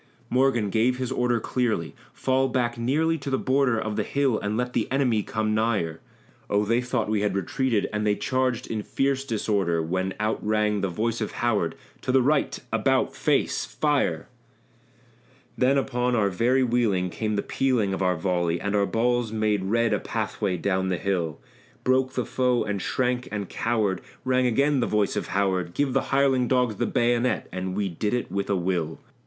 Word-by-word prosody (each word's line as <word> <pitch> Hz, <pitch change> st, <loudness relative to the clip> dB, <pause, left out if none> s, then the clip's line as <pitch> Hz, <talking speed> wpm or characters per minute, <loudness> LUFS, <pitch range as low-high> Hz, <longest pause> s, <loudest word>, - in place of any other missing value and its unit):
Morgan 125 Hz, -5 st, +2 dB
gave 120 Hz, +4 st, +2 dB
his 130 Hz, -1 st, -3 dB
order 120 Hz, -1 st, +1 dB
clearly 110 Hz, -9 st, -1 dB, 0.2 s
"Fall 130 Hz, 0 st, +1 dB
back 120 Hz, -2 st, 0 dB
nearly 155 Hz, +7 st, +1 dB
to 140 Hz, -, -5 dB
the 135 Hz, -, +1 dB
border 130 Hz, -4 st, +2 dB
Of 110 Hz, -1 st, -3 dB
the 105 Hz, -, +1 dB
hill 135 Hz, -1 st, +1 dB
and 105 Hz, +1 st, -2 dB
let 125 Hz, 0 st, -2 dB
the -, -, -1 dB
enemy 130 Hz, -5 st, +2 dB
come 110 Hz, +1 st, -1 dB
nigher!" 105 Hz, -8 st, 0 dB, 0.5 s
Oh! 105 Hz, +1 st, +2 dB
they 115 Hz, +3 st, +2 dB
thought 125 Hz, 0 st, -1 dB
we 105 Hz, -1 st, 0 dB
had 105 Hz, -2 st, 0 dB
retreated, 105 Hz, +3 st, 0 dB
and 105 Hz, 0 st, -1 dB
they 105 Hz, -1 st, +2 dB
charged 130 Hz, +1 st, -1 dB
in 110 Hz, -2 st, -3 dB
fierce 135 Hz, +4 st, 0 dB
disorder, 100 Hz, -8 st, 0 dB
When 95 Hz, +4 st, -2 dB
out 110 Hz, +1 st, -1 dB
rang 105 Hz, -1 st, +1 dB
the 100 Hz, -, +1 dB
voice 115 Hz, +6 st, -2 dB
of 110 Hz, -, -3 dB
Howard 105 Hz, -9 st, 0 dB, 0.3 s
"To -, -, -1 dB
the 130 Hz, -1 st, +4 dB
right 140 Hz, +2 st, +1 dB, 0.2 s
about, -, -, +1 dB
face! -, -, +1 dB
Fire!" -, -, 0 dB, 1.3 s
Then 135 Hz, +2 st, +3 dB
upon 125 Hz, -2 st, 0 dB
our 100 Hz, -3 st, +2 dB
very 125 Hz, +7 st, +2 dB
wheeling 110 Hz, -7 st, +1 dB
came 110 Hz, +2 st, -2 dB
the 100 Hz, -, -1 dB
pealing 120 Hz, -7 st, +1 dB
of 95 Hz, -, -3 dB
our 90 Hz, -1 st, +2 dB
volley, 85 Hz, 0 st, 0 dB
And 100 Hz, +2 st, -2 dB
our 100 Hz, -1 st, +2 dB
balls 120 Hz, 0 st, +1 dB
made 105 Hz, -3 st, 0 dB
red 115 Hz, +3 st, +2 dB
a -, -, +1 dB
pathway 95 Hz, -3 st, -2 dB
down 95 Hz, +2 st, 0 dB
the 90 Hz, -1 st, 0 dB
hill; 85 Hz, -6 st, -2 dB, 0.4 s
Broke 130 Hz, 0 st, +2 dB
the 125 Hz, -, -1 dB
foe 125 Hz, 0 st, +1 dB
and 105 Hz, -2 st, -3 dB
shrank 125 Hz, +2 st, -1 dB
and 100 Hz, -3 st, -4 dB
cowered; 110 Hz, -5 st, 0 dB, 0.2 s
rang 130 Hz, 0 st, +2 dB
again 140 Hz, +4 st, +2 dB
the 120 Hz, -, +1 dB
voice 105 Hz, -2 st, +1 dB
of -, -, -2 dB
Howard 95 Hz, -3 st, 0 dB
"Give 140 Hz, -3 st, +1 dB
the -, -, +3 dB
hireling 135 Hz, -2 st, +3 dB
dogs 125 Hz, -5 st, +1 dB
the -, -, 0 dB
bayonet!" 120 Hz, +1 st, +1 dB
and 95 Hz, 0 st, -4 dB
we 100 Hz, -1 st, 0 dB
did 105 Hz, +6 st, -1 dB
it 125 Hz, -, -3 dB
with 100 Hz, 0 st, -2 dB
a 100 Hz, -, +2 dB
will. 85 Hz, -3 st, -1 dB
110 Hz, 190 wpm, -25 LUFS, 100-125 Hz, 1.3 s, the